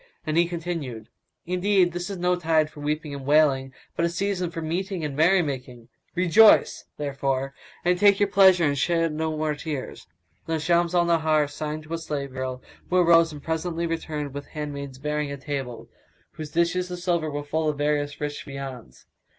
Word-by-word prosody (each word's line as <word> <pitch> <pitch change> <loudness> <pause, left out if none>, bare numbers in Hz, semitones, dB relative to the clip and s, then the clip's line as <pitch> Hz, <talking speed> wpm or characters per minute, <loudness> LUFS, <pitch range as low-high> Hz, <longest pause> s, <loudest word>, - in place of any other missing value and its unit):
And 155 - -1
he 170 +1 +4
continued, 165 -10 -5 0.4
"Indeed, 180 0 +2
this 175 +2 -4
is 195 - -4
no 180 +1 +2
tide 160 -3 +1
for - - -13
weeping 150 0 -3
and 140 -1 -6
wailing, 140 -2 +3 0.2
but 170 - 0
a 170 - +2
season 185 0 -1
for 165 - -6
meeting 175 +2 -3
and 145 -2 -4
merry 175 +5 +4
making; 125 -5 -6 0.3
rejoice, 185 +5 +5
therefore, 135 -2 -2 0.3
and 180 0 +2
take 200 0 +5
your 205 - +4
pleasure 190 -3 +5
and 145 -1 +1
shed 165 +2 +1
no 160 0 -2
more 155 0 0
tears!" 150 -2 -6 0.4
Then 165 -1 -1
Shams 170 +2 +2
al 175 -1 +4
Nahar 155 -3 +2
signed 150 +1 -5
to 155 +2 -8
a 165 - -2
slave 145 -4 -4
girl, 130 0 -5 0.3
who 185 - +2
arose 165 -2 +5
and 145 -2 -10
presently 165 +1 -2
returned 155 -4 -4
with 145 0 -7
handmaids 140 -3 -6
bearing 150 +1 -2
a 140 - -5
table, 135 -4 -5 0.4
whose 155 -1 -7
dishes 170 +3 0
of 180 - -5
silver 175 -3 0
were 145 0 -4
full 155 +2 -1
of 150 - -3
various 145 0 -1
rich 145 0 -4
viands. 135 - -8
155 Hz, 185 wpm, -25 LUFS, 145-175 Hz, 0.4 s, rejoice